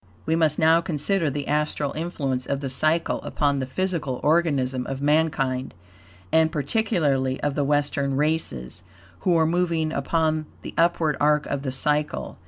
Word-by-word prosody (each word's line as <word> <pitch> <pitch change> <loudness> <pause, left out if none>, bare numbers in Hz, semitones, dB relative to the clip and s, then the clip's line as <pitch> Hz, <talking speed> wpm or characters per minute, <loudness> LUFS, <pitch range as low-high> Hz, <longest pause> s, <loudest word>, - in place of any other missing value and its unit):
We 160 - +1
must 160 -3 +2
now 160 +1 +4
consider 170 +1 0
the 145 +1 -4
astral 150 -1 -1
influence 140 -6 -3
of 140 - -1
the 135 -2 -4
cycle 155 +5 0
upon 140 -1 0
the 130 - -3
physical 155 -4 -2
organism 140 -6 +1
of 135 -1 -4
mankind, 145 -3 0 0.6
and 160 0 +4
particularly 145 - 0
of 145 - 0
the 145 - 0
Western 140 -1 0
races, 140 - -2 0.4
who 175 - +2
are 160 - +4
moving 165 -2 0
upon 155 +1 0 0.2
the - - -7
upward 165 -3 +2
arc 150 0 +3
of 140 - -3
the 135 -2 -3
cycle. 150 +3 -1
150 Hz, 155 wpm, -24 LUFS, 135-160 Hz, 0.6 s, now